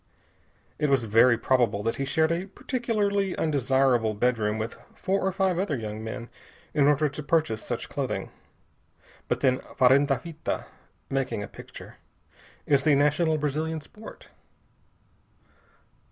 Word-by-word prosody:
It 150 Hz, -1 st, +1 dB
was 135 Hz, -3 st, +3 dB
very 115 Hz, +2 st, +5 dB
probable 120 Hz, -5 st, +1 dB
that 115 Hz, -, -1 dB
he 135 Hz, -, -1 dB
shared 160 Hz, +3 st, +2 dB
a 175 Hz, +3 st, -2 dB
particularly 205 Hz, -3 st, -1 dB
undesirable 130 Hz, -6 st, +2 dB
bedroom 110 Hz, -2 st, +1 dB
with 110 Hz, +1 st, -4 dB, 0.2 s
four 195 Hz, +1 st, -1 dB
or 190 Hz, -, +1 dB
five 190 Hz, -2 st, +1 dB
other 170 Hz, -8 st, -1 dB
young 110 Hz, -1 st, -5 dB
men 115 Hz, +1 st, -6 dB, 0.5 s
in 145 Hz, -1 st, +4 dB
order 150 Hz, +1 st, +3 dB
to 145 Hz, +1 st, -6 dB
purchase 150 Hz, -8 st, 0 dB
such -, -, -4 dB
clothing, -, -, -3 dB, 1.0 s
but -, -, -1 dB
then, 130 Hz, -1 st, +3 dB, 0.2 s
farenda 135 Hz, +2 st, +4 dB
fita 165 Hz, -2 st, -4 dB, 0.4 s
making 135 Hz, -6 st, -2 dB
a -, -, -6 dB
picture -, -, -12 dB, 0.7 s
is 140 Hz, -2 st, +3 dB
the 145 Hz, 0 st, +4 dB
national 150 Hz, +3 st, +2 dB
Brazilian 155 Hz, +2 st, -2 dB
sport. 210 Hz, +8 st, -13 dB
140 Hz, 135 wpm, -26 LUFS, 120-160 Hz, 1.0 s, very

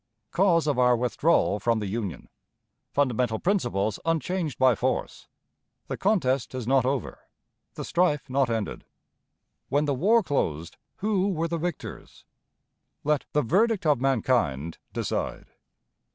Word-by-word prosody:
Cause 170 Hz, -4 st, +3 dB
of 145 Hz, -4 st, 0 dB
our 125 Hz, -1 st, +4 dB
Withdrawal 125 Hz, -3 st, +2 dB
from 115 Hz, +3 st, +1 dB
the 105 Hz, -, -3 dB
Union. 100 Hz, -2 st, -4 dB, 0.6 s
Fundamental 125 Hz, -5 st, +1 dB
Principles 120 Hz, -, 0 dB
unchanged 165 Hz, -1 st, -1 dB
by 130 Hz, -1 st, +5 dB
Force. 95 Hz, -, -2 dB, 0.6 s
The -, -, -2 dB
Contest 135 Hz, -, +1 dB
is 125 Hz, -3 st, -4 dB
not 130 Hz, 0 st, +3 dB
over; 135 Hz, -3 st, -2 dB, 0.6 s
the -, -, -5 dB
Strife 170 Hz, -6 st, +1 dB
not 135 Hz, -1 st, +1 dB
ended. 110 Hz, -3 st, -3 dB, 0.9 s
When 145 Hz, +2 st, +2 dB
the 145 Hz, -, +1 dB
War 210 Hz, -, +3 dB
closed, 85 Hz, -, -2 dB, 0.2 s
who 200 Hz, -1 st, +1 dB
were 165 Hz, -3 st, -1 dB
the 170 Hz, 0 st, -2 dB
Victors? 175 Hz, +2 st, -6 dB, 0.8 s
Let 150 Hz, -1 st, +1 dB
the 150 Hz, -, +2 dB
Verdict 200 Hz, -, +2 dB
of 145 Hz, -5 st, +3 dB
Mankind 115 Hz, -, 0 dB
decide. -, -, -3 dB
135 Hz, 130 wpm, -26 LUFS, 120-170 Hz, 0.9 s, by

